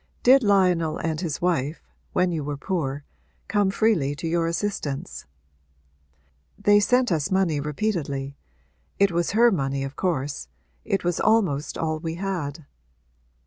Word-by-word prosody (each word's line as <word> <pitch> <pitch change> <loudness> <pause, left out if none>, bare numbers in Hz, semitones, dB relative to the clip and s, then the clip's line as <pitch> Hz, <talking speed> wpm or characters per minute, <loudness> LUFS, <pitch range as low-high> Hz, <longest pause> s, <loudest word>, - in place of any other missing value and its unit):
Did 265 +2 +7
Lionel 180 -7 +2
and 160 0 -2
his 165 -3 -3
wife, 160 -4 0 0.3
when 180 0 +1
you 160 -3 -2
were 145 0 -4
poor, 145 -3 -3 0.4
come 205 -2 +2
freely 190 -9 +1
to 165 - -5
your 165 0 +1
assistance?' 165 - -3 1.3
'They 205 0 +5
sent 245 +2 +2
us 155 0 0
money 190 -6 +1
repeatedly 145 -4 -2 0.6
it 200 -1 +3
was 170 +1 0
her 235 +1 +6
money 135 -6 -1
of 135 0 -6
course. 145 -6 -2 0.4
It 195 -3 -1
was 175 -1 0
almost 175 -10 +1
all 155 -1 -1
we 165 0 -4
had.' 170 -6 -4
170 Hz, 140 wpm, -24 LUFS, 145-195 Hz, 1.3 s, Did